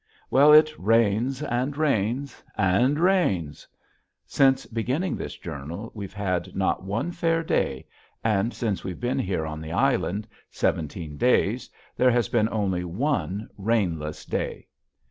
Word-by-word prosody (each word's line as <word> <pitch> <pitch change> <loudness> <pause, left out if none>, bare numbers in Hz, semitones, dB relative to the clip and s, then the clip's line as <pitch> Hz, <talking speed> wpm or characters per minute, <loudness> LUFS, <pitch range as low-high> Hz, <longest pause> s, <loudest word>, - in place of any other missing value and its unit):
Well, 145 +3 +7
it 155 0 +7
rains 115 +6 +2
and 135 +1 -1
rains 135 -2 -1
and 115 +10 +3
rains. 140 - +1 0.6
Since 135 -1 +3
beginning 130 +10 -1
this - - -6
journal 80 +10 -7
we've 100 -3 -7
had 90 -4 -2
not 95 -1 0
one 115 - -2
fair 165 -1 0
day, 70 - -1 0.4
and 110 +1 +1
since 110 -6 -2
we've 90 -2 -5
been 125 +2 -1
here 90 -8 -1
on 80 0 -5
the 80 0 -6
island, 105 +4 +1 0.2
seventeen 75 -1 -2
days, 125 - +2 0.3
there 125 - +4
has 120 -3 +1
been 110 -2 +2
only 95 -5 -1
one 105 - -2
rainless 90 -8 -1
day. - - -4
110 Hz, 135 wpm, -25 LUFS, 95-135 Hz, 0.6 s, Well